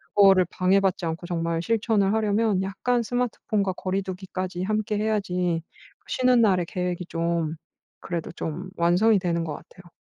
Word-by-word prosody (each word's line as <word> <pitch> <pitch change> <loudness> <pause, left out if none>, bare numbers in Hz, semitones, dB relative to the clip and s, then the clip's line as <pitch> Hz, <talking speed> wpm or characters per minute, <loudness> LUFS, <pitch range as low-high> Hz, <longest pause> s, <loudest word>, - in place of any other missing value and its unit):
그거를 195 -2 +6
방해받지 190 0 +2
않고 165 +2 -4
정말 165 -1 -1
실천을 215 -2 +1
하려면 215 -2 +1
약간 200 +6 0
스마트폰과 215 -5 -1
거리두기까지 185 -1 -4
함께 215 +1 -1
해야지 180 -6 0 0.4
그 - - -40
쉬는 255 -2 +3
날에 185 -5 +3
계획이 180 -2 -3
좀 165 -2 -1 0.4
그래도 170 -2 -4
좀 175 +3 -5
완성이 180 +6 +4
되는 170 -2 -1
것 155 -3 -4
같아요. 180 -1 -15
185 Hz, 340 characters per minute, -25 LUFS, 175-210 Hz, 0.4 s, 그거를